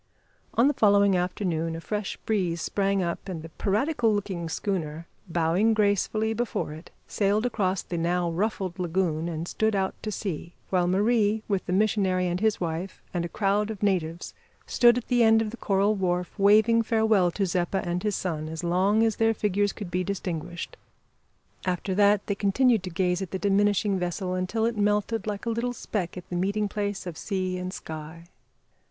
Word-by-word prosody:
'" - - -38
On 235 +4 +6
the 290 - +3
following 200 -4 +4
afternoon 175 -3 -1
a - - -5
fresh 210 +3 -4
breeze 180 -6 0
sprang 195 +2 0
up 170 +3 -4
and 165 -4 -5
the 165 - -8
piratical 225 - +1
looking 190 -5 -2
schooner, 165 -4 -3 0.2
bowing 175 +7 +2
gracefully 215 +1 +1
before 230 -9 -2
it, 160 +3 -11 0.2
sailed 205 +2 +1
across 195 -6 0
the 170 - -4
now 175 +1 +1
ruffled 185 0 -2
lagoon 170 -2 0
and 165 0 -4
stood 220 +2 0
out 190 -1 0
to 215 - -4
sea, 175 -4 -5 0.2
while 180 -2 +2
Marie 210 +3 +2
with 195 -3 0
the - - -2
missionary 190 -2 +2
and 175 +1 -1
his 220 0 +1
wife, 170 +2 -4
and 175 -2 -1
a - - -5
crowd 205 +3 +1
of 215 -2 -6
natives, 175 -4 -1 0.3
stood 240 0 +5
at 245 - -4
the 245 -1 +2
end 225 -1 +6
of 220 -1 -1
the 240 - -8
coral 200 0 +2
wharf, 180 -3 -1
waving 215 +3 +5
farewell 220 -5 +3
to 195 +3 -1
Zeppa 180 +1 -1
and 175 +1 -1
his 210 -1 -1
son 155 -4 -3
as 160 +1 -6
long 190 +5 +2
as 225 -1 +1
their 225 0 +2
figures 205 -1 +1
could 200 -5 -8
be 180 +1 0
distinguished. 175 -3 -4 0.9
After 185 +1 -1
that, 205 +1 +4
they 200 - 0
continued 215 +3 +2
to - - -4
gaze 180 +1 0
at 190 - -4
the 190 - -3
diminishing 200 0 +2
vessel 180 +1 -2
until 185 +5 -1
it 230 0 0
melted 210 +1 0
like 205 0 -3
a 230 - 0
little 240 +2 -1
speck 185 -7 -4
at 180 - -8
the - - -2
meeting 200 +4 0
place 205 -1 -3
of 175 -3 -6
sea 185 -2 -2
and 180 0 -4
sky. 160 0 -8
195 Hz, 190 wpm, -26 LUFS, 175-210 Hz, 0.9 s, On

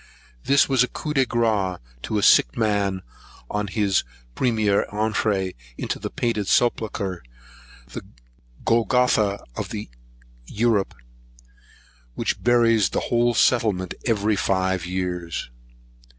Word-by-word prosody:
This 140 0 +4
was 135 -3 +2
a 125 - +3
coup 150 +3 -5
de 135 -3 +2
grace 110 -6 0 0.2
to 110 - -2
a 100 - 0
sick - - +5
man 100 -4 0 0.5
on 105 0 -2
his 100 -1 +1 0.3
premier 110 - +1
entree 105 -3 0 0.2
into - - -3
this - - -5
painted 110 -5 -1
sepulchre, 105 -6 0 0.6
this - - -8 0.6
golgotha 115 -3 +2
of - - -5 0.8
Europe, 110 -3 0 1.2
which - - -2
buries 115 -3 +3
the - - -1
whole 120 0 +2
settlement 105 -8 +2
every 110 -2 +1
five 95 -3 0
years. 90 -5 -4
105 Hz, 110 wpm, -23 LUFS, 95-115 Hz, 1.2 s, sick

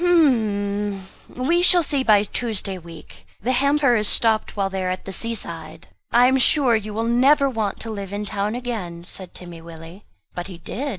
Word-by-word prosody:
"H'm'm 210 - +1 0.3
we 310 +8 0
shall 355 -1 +6
see 285 -2 0
by 210 -4 +4
Tuesday 210 -3 -3
week; 165 -2 -14
the 240 +6 -1
hamper 280 0 +2
is 215 -2 +1
stopped 220 -1 +1
while 195 -1 +1
they 190 -1 -4
are 185 - -1
at 185 0 -4
the 195 - -6
sea 230 +5 -2
side." - - -7 0.2
"I 245 +1 +5
am 265 +1 +3
sure 260 -2 +4
you 215 -1 -3
will 220 +2 -2
never 270 +5 +4
want 220 -6 -2
to 225 - -6
live 200 -3 -6
in 205 +1 -4
town 205 +2 -2
again," 210 -9 -5
said 185 0 -5
Timmy 175 -2 -10
Willie. 165 +3 -12 0.3
But 175 +1 -5
he 185 -3 -10
did. 240 - -5
215 Hz, 195 wpm, -22 LUFS, 195-250 Hz, 0.3 s, shall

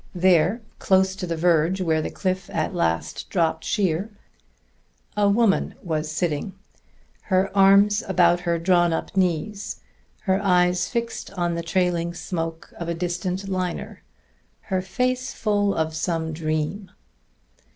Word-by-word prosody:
There, 180 +4 +3 0.2
close 190 0 +3
to 180 - -4
the 165 -1 -2
verge 170 +2 +2
where 160 -4 +1
the - - -3
cliff 185 -1 -2
at - - -2
last 80 -1 -1
dropped 160 -1 0
sheer, 190 -1 0 1.1
a 205 -1 +3
woman 215 -1 +2
was 155 -3 -2
sitting, 165 +3 -2 0.7
her 190 0 +1
arms 200 +2 +5
about 175 -2 +4
her 170 -1 0
drawn 175 0 +3
up 165 - -4
knees, 190 +3 -1 0.4
her 190 0 +1
eyes 180 -2 +3
fixed 235 -1 -3
on 175 -2 -1
the 170 - -2
trailing 170 0 0
smoke 165 -2 -5
of 170 -1 -4
a 170 - -1
distant 180 +2 -3
liner, 185 -2 -3 0.6
her 185 -1 -2
face 250 +6 -2
full 205 -2 +1
of 160 0 -1
some 160 0 -2
dream. 155 +5 -2
180 Hz, 135 wpm, -24 LUFS, 165-195 Hz, 1.1 s, arms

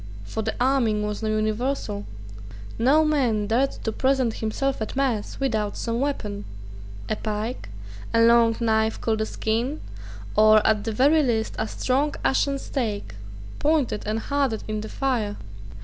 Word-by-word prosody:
For 105 - -4
the 220 0 -3
arming 245 -5 +2
was 210 +1 -4
now 220 - -1
universal. 215 - -1 0.7
No 285 +7 +4
man 250 -9 +1
dared 240 +6 +2
to 220 - -1
present 260 -1 +1
himself 260 +4 -1
at 220 - -4
mass 255 -6 -1
without 220 -6 -1
some 230 0 -2
weapon, 215 -7 -2 0.6
a 215 - 0
pike, 215 - -4 0.4
a 230 - +3
long 230 0 +5
knife 220 -1 +1
called 220 -1 0
a 220 - -1
skean, 235 +7 -1 0.6
or, 215 0 +6
at 210 -1 +2
the 225 - -1
very 285 +8 +4
least, 230 -5 0
a 220 - 0
strong 275 +6 0
ashen 275 +1 +2
stake, 220 - -3 0.5
pointed 290 -8 +1
and 215 +1 0
hardened 270 -2 -1
in 215 -1 -2
the 215 - -7
fire. 235 -7 -1
225 Hz, 150 wpm, -24 LUFS, 215-270 Hz, 0.7 s, or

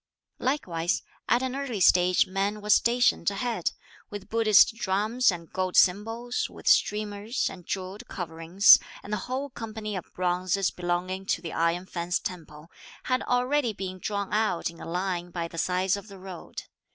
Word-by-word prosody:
Likewise, 175 - -1 0.3
at 245 - +3
an 260 0 -2
early 275 -6 -3
stage 180 0 +5
men 195 +2 -2
were 210 0 -1
stationed 235 -4 +3
ahead, 205 -2 -1 0.4
with 205 -1 -8
Buddhist 220 0 +5
drums 215 +3 +1
and 170 -2 -8
gold 185 -1 -2
cymbals, 225 +6 +2
with - - -12
streamers, 210 +2 +1
and 180 -2 -12
jewelled 190 +1 -5
coverings; 170 +2 +4 0.2
and 205 - -6
the - - +1
whole 265 +2 -3
company 220 -3 -6
of 180 - -7
bonzes, 180 +1 0
belonging 180 +2 -3
to - - +1
the 165 - -7
Iron 170 +2 0
Fence 175 -1 -2
Temple, 160 -3 -8 0.3
had 255 0 0
already 250 0 +1
been 185 -2 -6
drawn 200 0 -3
out 210 -6 0
in 170 - -15
a - - -7
line 180 0 -2
by 170 -1 -4
the 165 0 -7
sides 185 +3 +1
of 200 +1 -8
the 200 -2 -11
road. 185 -2 -8
195 Hz, 165 wpm, -27 LUFS, 180-220 Hz, 0.4 s, stage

